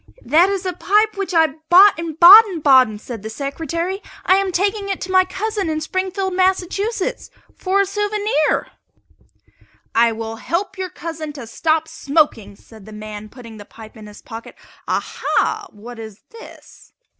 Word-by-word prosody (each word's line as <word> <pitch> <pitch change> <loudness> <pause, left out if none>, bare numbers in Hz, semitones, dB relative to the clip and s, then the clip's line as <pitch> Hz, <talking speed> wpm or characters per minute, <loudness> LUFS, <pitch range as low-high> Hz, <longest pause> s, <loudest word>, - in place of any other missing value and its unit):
"That 325 +9 +4
is 395 -1 -3
a 365 - -2
pipe 425 +5 +1
which 395 -1 -4
I 325 -2 +4 0.2
bought 375 0 +7
in 330 -2 -5
Baden 370 +1 +8
Baden," 260 -7 +4
said 225 0 -9
the 220 - -7
Secretary. 330 - -4 0.2
"I 375 - +4
am 390 -1 -1
taking 400 +3 -1
it 390 - -3
to 375 - -5
my 370 0 +4
cousin 400 -1 -3
in 310 0 -2
Springfield, 375 +3 -3
Mass., 375 0 +2 0.9
for 390 +1 0
a - - +1
souvenir." 415 -4 -1 1.2
"I 230 0 +3
will 225 0 -6
help 345 - -3
your 375 -1 -5
cousin 320 -2 -7
to 275 -5 -9
stop 315 +7 -1
smoking," 280 -11 -1
said 220 0 -17
the - - -11
man, 215 0 -9
putting 230 -2 -13
the 205 - -10
pipe 220 +1 -14
in 215 -2 -12
his 210 - -14
pocket. 225 -1 -10 0.3
"Aha! 435 -2 -1
what 225 +3 -12
is 220 -2 -10
this?" 460 0 -15
330 Hz, 165 wpm, -19 LUFS, 230-385 Hz, 1.2 s, Baden